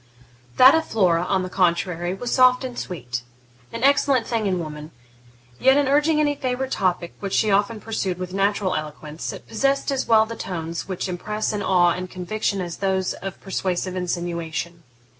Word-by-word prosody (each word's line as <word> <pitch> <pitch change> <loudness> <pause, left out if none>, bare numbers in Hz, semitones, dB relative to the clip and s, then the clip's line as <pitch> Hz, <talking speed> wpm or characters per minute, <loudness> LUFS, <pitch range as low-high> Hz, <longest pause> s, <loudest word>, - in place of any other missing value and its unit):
That 260 +2 +9
of 320 0 +3
Flora, 180 -6 +2
on 190 -1 +1
the - - -3
contrary, 175 -1 0
was 240 +5 -4
soft 255 0 +5
and 255 -2 -5
sweet 125 - -5 0.5
'an 230 +1 -5
excellent 275 -3 +3
thing 225 -3 -1
in 185 -2 +1
woman'; 155 -2 -6 0.7
yet, 265 +1 +5
in 290 -2 +2
urging 300 +3 +3
any 295 -1 +2
favourite 265 -1 -3
topic, 180 -3 0
which 195 -1 -4
she 215 - +2
often 205 +3 +1
pursued 200 -5 -3
with 180 0 -6
natural 195 0 +1
eloquence, 155 +1 -5
it - - -10
possessed 275 +5 0
as 270 - -1
well 220 -1 +5
the 230 +1 -7
tones 165 -4 -5
which 185 -1 -3
impress 210 +5 -3
awe 185 -4 +3
and 180 +1 -4
conviction 195 +2 -2
as 175 -2 -5
those 190 -1 0
of 195 0 -7
persuasive 185 -1 -2
insinuation. 170 -2 -3
195 Hz, 175 wpm, -23 LUFS, 175-230 Hz, 0.7 s, That